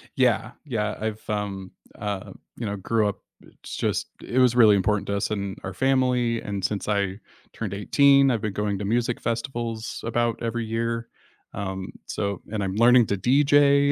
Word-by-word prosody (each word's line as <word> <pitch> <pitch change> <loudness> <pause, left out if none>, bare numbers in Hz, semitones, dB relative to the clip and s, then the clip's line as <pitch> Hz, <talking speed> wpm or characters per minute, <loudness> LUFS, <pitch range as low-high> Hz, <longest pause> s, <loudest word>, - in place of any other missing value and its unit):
Yeah, 125 -3 +2
yeah, 110 -6 -2
I've, 110 0 -5
um, 100 -3 -3 0.3
uh, 100 -2 -4 0.3
you 115 - -4
know, 100 - -2
grew 105 +2 +1
up - - -5 0.2
it's - - -11
just - - -1 0.2
it 130 - 0
was 125 -1 +4
really 110 -4 +7
important 100 +1 +1
to 100 - -1
us 100 - -1
in 100 -2 -3
our - - -5
family, 125 -3 +1
and 100 -2 -4
since 105 -1 -2
I 100 -1 0 0.3
turned 105 -4 -4
18, 140 +5 +5
I've 115 -3 -1
been 105 -3 -2
going 105 -1 -1
to 100 - -3
music 120 +2 0
festivals 115 -1 -3
about 120 +1 0
every 115 0 -2
year, 115 +1 -2 0.5
um, 95 -1 -4 0.2
so 100 -2 -3
and 105 -2 -1
I'm 95 -1 -2
learning 120 +1 +6
to 100 - 0
DJ 140 +4 +4
110 Hz, 175 wpm, -25 LUFS, 100-120 Hz, 0.5 s, really